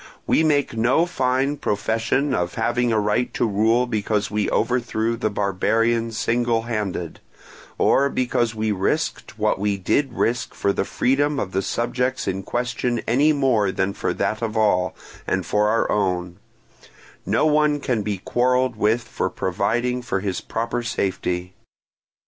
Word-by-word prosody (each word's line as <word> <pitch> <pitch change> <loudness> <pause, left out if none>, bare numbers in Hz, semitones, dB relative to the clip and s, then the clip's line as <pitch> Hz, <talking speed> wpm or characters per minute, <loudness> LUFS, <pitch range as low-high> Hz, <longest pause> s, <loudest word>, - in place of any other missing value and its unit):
We - - +3
make 145 -6 +1
no 120 +9 +3
fine 135 -2 0
profession 115 +4 0
of 90 -5 -1
having 120 0 +1
a 110 - +2
right 105 +4 0
to - - +1
rule 110 +3 +2
because 105 -3 -1
we 105 -1 0
overthrew 115 -1 0
the 115 -2 -1
barbarian 115 +4 +1
single 115 +1 0
handed, 105 -7 -3 0.6
or 140 +1 +3
because 120 -3 0
we 110 0 0
risked 95 -1 -2
what - - +1
we 100 0 0
did 135 +9 0
risk 115 0 -1
for 100 - +1
the - - -1
freedom 140 +5 +1
of 95 - -3
the 95 - 0
subjects 125 +4 -1
in 95 +1 -1
question 120 +3 -2
any 140 +6 +4
more 130 -9 +2
than 95 +1 -1
for - - -2
that 110 - -1
of 110 -1 -2
all, 90 -4 +2 0.3
and 95 -2 0
for 105 +4 +2
our 115 +2 +1
own: 90 -3 -1 0.9
no - - +1
one 150 -1 +3
can 125 -6 -1
be 105 -1 -2
quarrelled 125 +4 +1
with 110 +3 +2
for - - -3
providing 125 +2 -1
for 120 -5 -2
his 95 -2 -2
proper 115 +2 -2
safety. 90 -5 -2
115 Hz, 155 wpm, -22 LUFS, 105-125 Hz, 0.9 s, any